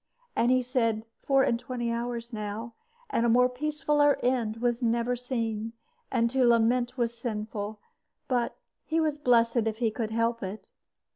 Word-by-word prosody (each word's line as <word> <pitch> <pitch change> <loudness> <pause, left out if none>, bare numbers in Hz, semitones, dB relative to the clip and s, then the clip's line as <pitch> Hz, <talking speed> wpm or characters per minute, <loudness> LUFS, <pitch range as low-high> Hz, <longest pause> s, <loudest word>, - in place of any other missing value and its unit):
And 235 - +3
he 255 0 +3
said, 230 -3 0 0.2
"Four 270 -1 +3
and 235 - +1
twenty 250 -2 -3
hours 235 0 -3
now; 215 +2 -5 0.4
and 230 - +1
a 235 - +3
more 250 +2 +5
peacefuller 290 +2 +1
end 235 -3 +1
was 240 +1 0
never 235 +1 +1
seen, 230 -3 -3 0.4
and 235 -3 +2
to 265 0 +2
lament 240 +1 +3
was 235 -1 0
sinful; 215 -2 -4 0.5
but 245 -2 0 0.3
he 320 +1 0
was 305 -2 0
blessed 235 -3 +3
if 220 -1 -2
he 230 -2 +1
could 220 0 -3
help 230 +1 0
it." 195 +3 -7
235 Hz, 160 wpm, -28 LUFS, 230-250 Hz, 0.5 s, more